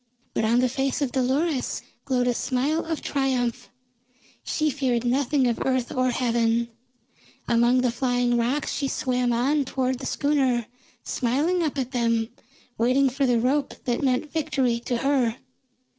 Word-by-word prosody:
But 220 - 0
on 235 +3 +3
the 255 - +3
face 270 +2 -1
of 265 - -2
Dolores 265 +3 0 0.2
glowed 255 -3 +1
a 245 - +2
smile 275 +7 0
of 325 -1 -3
triumph. 260 -4 -1 0.7
She 310 -1 0
feared 250 -3 -1
nothing 265 +2 +2
of 235 -2 0
earth 255 -2 0
or 255 0 +1
heaven; 235 -1 +1 0.8
among 240 +2 +3
the 250 -2 +1
flying 245 0 +1
rocks 245 +5 0
she 280 - -1
swam 250 -2 0
on 275 +5 +2
toward 260 -1 -1
the 265 - -5
schooner, 265 -5 +1 0.4
smiling 295 +9 0
up 305 -4 -1
at 260 -2 -2
them, 230 -3 +1 0.5
waiting 255 +3 +3
for 270 +1 0
the 240 -2 +3
rope 275 +4 0
that 240 -1 0
meant 270 +2 0
victory 275 -7 0
to 245 - 0
her. 255 -3 +1
255 Hz, 155 wpm, -25 LUFS, 240-275 Hz, 0.8 s, on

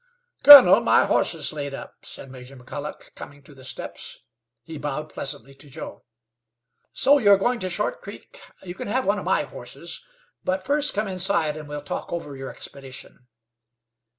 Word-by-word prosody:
"Colonel, 285 -2 +10
my - - +3
horse - - +1
is - - -3
laid 140 -2 -5
up," - - -12
said 135 - -8
Major 130 +1 -12
McColloch, 145 +4 -9
coming 145 0 -12
to 145 - -17
the 135 -1 -16
steps. 130 - -7 0.4
He 160 +1 -9
bowed 150 +1 -5
pleasantly 135 0 -6
to 140 +2 -14
Joe. - - -9 0.9
"So 285 +2 +4
you 205 -5 +4
are 200 - +7
going 240 +5 0
to 185 - -3
Short 205 +4 -2
Creek? 200 - -12 0.2
You 175 -2 -7
can - - -7
have 255 +5 -1
one 205 +1 +1
of - - -8
my - - +1
horses; - - -8 0.4
but 185 0 -2
first 290 -1 +1
come 210 +1 -1
inside 185 -5 +1
and 155 -1 -9
we'll 145 0 -5
talk 145 - -6
over 155 -5 -5
you 135 0 -7
expedition." 130 -2 -11
155 Hz, 180 wpm, -23 LUFS, 140-200 Hz, 0.9 s, Colonel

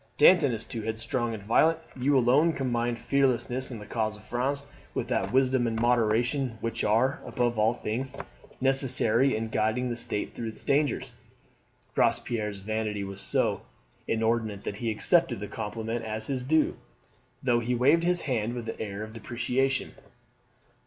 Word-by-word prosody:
Danton 170 -8 +6
is 115 -2 -3
too 115 - -4
headstrong 115 +2 -2
and 100 - -9
violent. 155 +10 +4 0.2
You 135 +2 +2
alone 135 +7 +4
combine 120 -3 -1
fearlessness 130 0 +1
in 120 - -6
the 105 - -9
cause 110 -1 -2
of 105 - -16
France 135 +5 -2 0.3
with - - -2
that - - 0
wisdom 130 -1 +3
and 115 -1 -2
moderation 120 +2 +1
which 115 0 -1
are, 115 +6 +2
above 120 -2 -1
all 110 +1 +4
things, 125 +4 -3 0.4
necessary 135 -1 +2
in 110 0 -3
guiding 110 +4 0
the - - -2
state 115 -3 -1
through 115 - -5
its 110 - -6
dangers." 145 +1 +1 0.8
Robespierre's 105 -3 +1
vanity 110 0 -2
was 100 0 -6
so - - +1 0.5
inordinate 110 -2 0
that 100 - -4
he 115 0 -2
accepted 165 - +2
the 105 - -5
compliment 115 +2 -4
as 110 0 -2
his 130 -1 -1
due, 155 +4 +2 0.7
though 120 -2 +3
he 120 +1 -1
waved 140 +7 +4
his 175 0 +2
hand 120 -4 -1
with 120 -2 -5
an - - -4
air 105 -1 -4
of 110 0 -9
deprecation. 125 +3 -1
120 Hz, 160 wpm, -28 LUFS, 110-130 Hz, 0.8 s, Danton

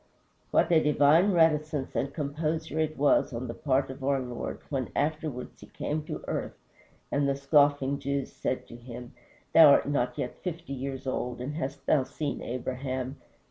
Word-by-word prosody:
What - - +3
a 160 -2 +6
divine 150 +6 +4
reticence 155 -4 +2
and 140 - 0
composure 155 +2 -2
it 155 -1 -1
was, 145 +1 +3
on 120 +2 -4
the 115 - -4
part 135 0 0
of 130 +1 -10
our 135 0 +2
Lord, 125 -2 -5
when 130 -7 -1
afterwards 150 -3 -2
he - - -11
came 155 +1 -3
to - - -6
earth - - -3 0.5
and 140 0 +2
the 140 - +1
scoffing 140 -1 +3
Jews 140 -1 -2
said 130 - -3
to - - -9
him, 120 0 -9 0.4
"Thou 160 -2 +9
art 140 - +5
not 140 -4 0
yet 125 - -4
fifty 170 -5 -5
years 135 0 -5
old, 125 -2 -2
and 130 +4 -4
hast 135 -3 -5
thou 145 -4 +3
seen 145 +2 -4
Abraham?" 130 +2 -4
140 Hz, 175 wpm, -28 LUFS, 130-155 Hz, 0.5 s, Thou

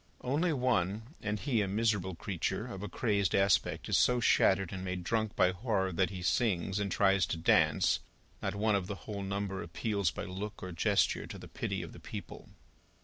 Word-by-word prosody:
Only 150 +7 +1
one, 115 - 0
and 105 0 -2
he 120 -4 +1
a 100 - 0
miserable 100 -3 0
creature, 95 +4 -2
of 120 -6 -7
a 105 - -5
crazed 100 -2 +1
aspect, 95 -3 +2
is - - +3
so 125 0 +4
shattered 95 -5 +3
and 95 -1 -5
made 90 -1 -3
drunk 110 +2 -1
by 90 - +4
horror, 95 -1 -1
that 90 0 +1
he 90 -1 -6
sings, 95 -2 +1
and 100 -2 -2
tries 95 0 +3
to - - -2
dance. 80 -2 +3 0.4
Not - - -2
one 105 +1 +2
of 95 -3 0
the 100 - -4
whole 105 -2 -4
number 100 0 -3
appeals 100 +2 -1
by - - -5
look 100 +3 -6
or 95 - -5
gesture, 85 - +1
to - - -8
the - - -10
pity - - -3
of - - -9
the - - -11
people. - - -8
100 Hz, 200 wpm, -32 LUFS, 95-110 Hz, 0.4 s, so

